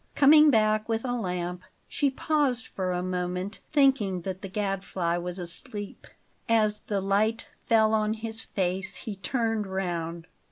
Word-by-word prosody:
Coming 300 +2 +7
back 215 -3 +2
with 225 +2 -1
a 245 - -1
lamp, 180 -5 -3 0.3
she 285 - +1
paused 270 -3 0
for 185 -1 -3
a 180 0 -1
moment, 180 +2 -3
thinking 265 - +3
that 185 +2 -5
the 195 - -5
Gadfly 195 -3 -1
was 175 +1 -4
asleep. 205 +4 -5 0.4
As 215 -2 +3
the 205 -2 -2
light 210 +4 +1 0.2
fell 220 -1 +4
on 215 0 +1
his 225 0 -4
face 190 0 -2
he 215 - -6
turned 225 +1 -1
round. 170 -3 -3
205 Hz, 150 wpm, -27 LUFS, 180-225 Hz, 0.4 s, Coming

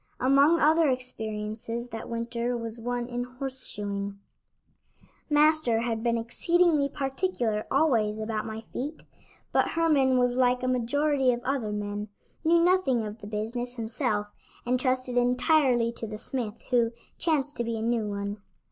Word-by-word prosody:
Among 280 +6 +5
other 315 +1 +4
experiences 230 -2 -3
that 225 -2 -7
winter 235 +1 -2
was 230 0 -6
one 245 +1 -2
in 245 0 -3
horse 260 +1 -3
shoeing. 200 -1 -4 1.1
Master 300 -6 +4
had 230 -2 -2
been 235 0 +1
exceedingly 300 +5 +2
particular 270 - -1
always 225 -9 +2
about 220 0 -3
my 220 0 -5
feet, 295 +5 -5 0.5
but - - +3
Herman 290 -6 +3
was 245 -1 +2
like 250 0 +2
a - - 0
majority 265 +2 +2
of 240 0 -3
other 260 -6 -1
men; 205 0 -3 0.4
knew 335 +1 +5
nothing 340 -11 +3
of 210 +1 -7
the 205 - -8
business 230 +4 -3
himself 220 -2 -1 0.4
and 250 +1 +1
trusted 255 -1 0
entirely 250 -1 +3
to 235 -1 -5
the 215 0 -6
smith, 225 -2 -4
who 235 -2 +4 0.3
chanced 290 -4 0
to 235 - 0
be 230 -1 -2
a - - -4
new 230 -2 0
one. 200 0 -3
245 Hz, 150 wpm, -27 LUFS, 225-270 Hz, 1.1 s, Among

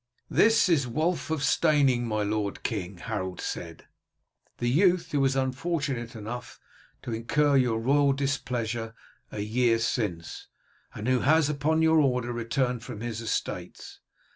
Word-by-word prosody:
"This 225 -1 +4
is 150 -8 +2
Wulf 160 +10 -1
of 160 -3 -1
Steyning, 140 -6 +3
my 110 -1 0
lord 105 -1 -2
king," 95 -4 -3
Harold 95 -2 -4
said, 85 -2 -6 0.7
"the 120 - -2
youth 175 +7 +3
who 145 - +1
was 135 -1 +2
unfortunate 135 -3 -2
enough 110 +1 -7 0.4
to 120 - -4
incur 140 +6 +1
your 125 -4 +3
royal 140 +4 +3
displeasure 120 -5 -2 0.4
a 105 - -4
year 115 +2 +2
since, 105 -7 -3 0.5
and 105 +2 -5
who 130 -1 +3
has 150 +2 +3
upon 155 +3 +1
your 160 0 +5
order 125 -4 +1
returned 120 +1 -1
from 120 -4 -8
his 115 -1 -4
estates. 115 - -4
125 Hz, 140 wpm, -27 LUFS, 115-145 Hz, 0.7 s, your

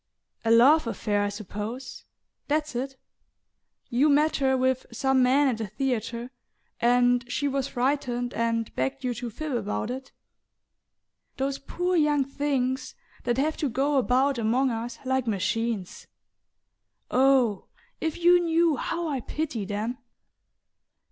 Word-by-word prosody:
"A 225 - 0
love 250 +5 +6
affair, 205 -2 -1
I 205 - 0
suppose... 215 +5 -6 0.4
that's 300 0 0
it? 265 +2 -3 0.9
You 265 +6 +3
met 300 +2 +3
her 265 -1 +2
with 260 0 0
some 265 +3 +2
man 270 +3 +4
at 240 -4 0
the 220 - -3
theatre 235 +2 -3 0.5
and 245 0 +3
she 285 - 0
was 275 -1 -1
frightened 245 -2 -1
and 230 0 -1
begged 270 0 -2
you 250 -1 0
to 240 0 -5
fib 310 +7 -5
about 220 -1 -2
it? 260 +1 -7 1.3
Those 270 +1 -1
poor 360 +5 -2
young 295 -3 +3
things 270 -1 -2 0.3
that 240 0 +1
have 305 +3 0
to 290 - -1
go 275 +4 +1
about 260 +1 +2
among 245 +4 +2
us 230 +1 -4
like 260 -1 0
machines 215 -1 -2 1.0
oh, 255 -6 +3 0.3
if 320 -1 -2
you 350 +1 +6
knew 335 -3 +2
how 340 +6 -2
I 280 -4 -1
pity 250 -5 -3
them!" 215 +5 -3
260 Hz, 135 wpm, -26 LUFS, 230-280 Hz, 1.3 s, love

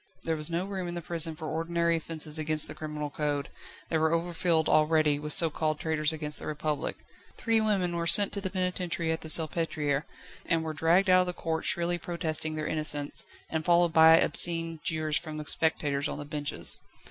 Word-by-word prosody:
There 165 - -1
was 150 +1 +3
no 170 +2 -2
room 190 -2 -5
in 175 - -5
the 175 - -4
prison 165 -1 +1
for 155 0 -8
ordinary 170 +1 -1
offences 160 -1 -1
against 155 0 +2
the - - -8
criminal 150 -1 -6
code; 145 -1 -3 0.4
they 160 - 0
were 160 +1 +1
overfilled 170 -1 0
already 155 -1 +2
with 150 0 -6
so 165 +1 +7
called 155 0 -2
traitors 155 -1 0
against 150 -1 -4
the - - -9
Republic. 150 0 -3 0.4
Three 225 -2 +1
women 190 -5 0
were 170 0 -2
sent 205 +3 +7
to 200 - -3
the 190 - -3
penitentiary 180 -3 -3
at 160 - -3
the - - -8
Salpêtriere, 155 -3 +1 0.4
and 165 -1 0
were 160 -1 -5
dragged 165 +6 +2
out 185 0 +5
of 180 - -2
the 180 - -2
court 160 -2 -4
shrilly 175 0 -1
protesting 160 -2 -2
their 155 0 -4
innocence, 150 -2 -4 0.2
and 160 -1 -3
followed 170 -1 +2
by 160 0 +7
obscene 165 +1 +2
jeers 155 -1 -1
from 155 -2 -6
the 150 - -7
spectators 145 -3 -1
on - - -6
the 145 - -7
benches. 145 -1 +1
160 Hz, 200 wpm, -28 LUFS, 155-170 Hz, 0.4 s, so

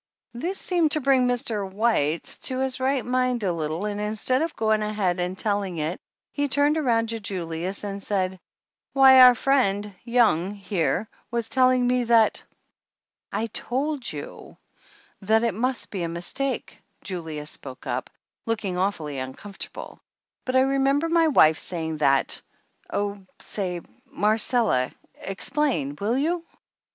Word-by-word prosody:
This 345 +11 -3
seemed 340 -5 +1
to 310 - +2
bring 265 -2 +3
Mr. 225 -5 -2
White 190 -7 +1 0.2
to 260 -1 0
his 265 -1 0
right 265 0 0
mind 250 -2 0
a 185 -3 +1
little 160 +3 -3
and 210 0 -3
instead 220 +5 0
of 325 0 -2
going 220 -1 +1
ahead 205 -4 0
and 180 +1 -2
telling 200 -4 -1
it 155 +3 -3 0.3
he 285 0 0
turned 285 +2 +2
around 235 -7 +1
to 225 0 -2
Julius 185 -2 -4
and 200 -1 -4
said: 190 -2 -1 0.5
"Why 265 -1 +8
our 250 -1 +9
friend, 210 -6 +1
Young, 210 -6 +2
here, 195 +1 -1 0.2
was 235 0 -2
telling 255 -2 +4
me 250 0 +2
that 230 -2 +3 0.4
" - - -68
"I 225 - -1
t 230 0 -4
old 275 +1 -1
you - - -9 0.6
that 220 +3 +3
it 230 -3 +1
must 250 +4 -2
be 195 - -3
a 170 - -1
mistake," 180 +11 -4 0.2
Julius 160 -5 -5
spoke 130 -2 -10
up, - - -3 0.4
looking 205 -5 -1
awfully 160 -8 -2
uncomfortable, 130 +10 -8 0.5
"but 255 - -1
I 260 - +6
remember 275 +4 +2
my 330 -1 +4
wife 160 - +5
saying 160 -3 -4
that 140 -2 +2 0.5
oh, 205 0 -2 0.2
say, 180 -4 -4 0.3
Mar 215 +4 +1
cella, 220 - +2 0.3
explain 195 - -1
will 220 +5 0
you?" 330 +4 0
215 Hz, 150 wpm, -25 LUFS, 185-255 Hz, 0.6 s, our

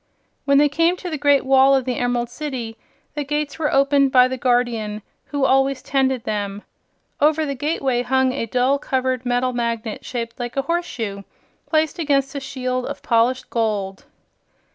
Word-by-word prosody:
When 280 0 +4
they 295 +1 +5
came 330 +5 +1
to 360 -1 -6
the 310 - -2
great 285 -1 +3
wall 270 +1 +5
of 265 -2 0
the 250 -2 -2
Emerald 245 -1 -1
City, 250 -5 -5 0.4
the 295 - -3
gates 295 +1 -3
were 300 -2 0
opened 275 0 +3
by 250 -1 +6
the 260 - -3
Guardian 235 -4 0 0.2
who 285 -2 -1
always 270 0 +2
tended 265 -3 0
them. 205 -1 -3 0.6
Over 310 +2 +3
the 280 - -2
gateway 270 -3 -1
hung 260 +1 +2
a 255 -3 -3
dull 255 +4 +1
colored 260 -2 -1
metal 245 +1 +1
magnet 230 -2 -3
shaped 230 -1 -5
like 245 +2 -5
a 275 - +1
horse 345 +3 -1
shoe, 200 -4 -5 0.4
placed 315 0 0
against 280 -3 +1
a 280 - -3
shield 255 -2 -3
of - - -7
polished 245 +2 +1
gold. 205 -4 -2
260 Hz, 175 wpm, -21 LUFS, 240-280 Hz, 0.6 s, by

